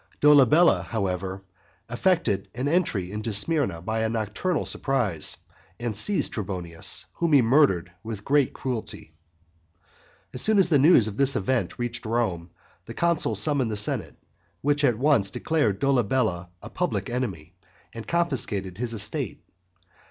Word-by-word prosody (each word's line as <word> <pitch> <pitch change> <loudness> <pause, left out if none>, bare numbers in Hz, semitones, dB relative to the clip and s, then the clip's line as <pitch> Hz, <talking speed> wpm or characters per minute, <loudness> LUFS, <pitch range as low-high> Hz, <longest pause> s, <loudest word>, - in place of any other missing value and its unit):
Dolabella, 150 +3 +5
however, 95 -3 -3 0.4
effected 120 - 0
an 130 +3 -2
entry 145 - 0
into 105 +2 -4
Smyrna 105 - +2
by 110 +3 -2
a 110 - 0
nocturnal 115 - -2
surprise, 115 - 0 0.4
and 120 -3 -3
seized 195 - 0
Trebonius, 90 -5 -3
whom 170 -2 0
he 135 -4 +6
murdered 115 - +2
with 110 -2 -7
great 145 -2 +2
cruelty. 115 -10 -5 1.2
As 125 - -2
soon 215 -1 +2
as 190 -3 +4
the 145 -5 +4
news 135 -6 +5
of 105 -1 -6
this 140 0 +3
event 120 +5 -1
reached 120 -1 -4
Rome, 95 -7 -2 0.4
the 115 - -8
consul 170 -9 +1
summoned 125 +3 +3
the 105 - -3
senate, 105 - 0 0.5
which 145 +1 +1
at 120 -6 +3
once 130 -7 +3
declared 130 -6 -1
Dolabella 115 -8 0
a - - -8
public - - -2
enemy, 95 -10 -4 0.4
and 115 -1 -9
confiscated 115 - -2
his 120 -1 -3
estate. 100 - -3
115 Hz, 140 wpm, -25 LUFS, 100-145 Hz, 1.2 s, he